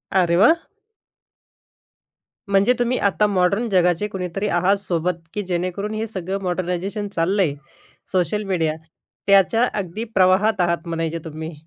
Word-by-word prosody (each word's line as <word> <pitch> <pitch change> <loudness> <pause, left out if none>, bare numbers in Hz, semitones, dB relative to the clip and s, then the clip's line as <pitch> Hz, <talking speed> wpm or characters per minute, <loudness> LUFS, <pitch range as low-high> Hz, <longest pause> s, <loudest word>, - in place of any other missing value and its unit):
अरे 170 -2 +3
वा! 225 - +7 2.0
म्हणजे 200 +5 +4
तुम्ही 245 +1 +1
आता 205 +1 +2
मॉडर्न 200 +4 +1
जगाचे 180 +1 +2
कुणीतरी 190 +1 -3
आहात 185 +2 +2
सोबत, 180 -2 -1 0.2
की 210 - -2
जेणेकरून 185 +4 -2
हे 220 +1 -3
सगळं 195 -1 -4
मॉडर्नायझेशन 185 +3 -2
चाललंय, 175 -2 +1 0.6
सोशल 200 +3 0
मीडिया 165 -5 0 0.5
त्याच्या 200 +5 +4
अगदी 205 +2 -4
प्रवाहात 190 +2 +3
आहात 170 0 0
म्हणायचे 165 0 -2
तुम्ही. 160 +1 -6
185 Hz, 125 wpm, -21 LUFS, 175-205 Hz, 2.0 s, वा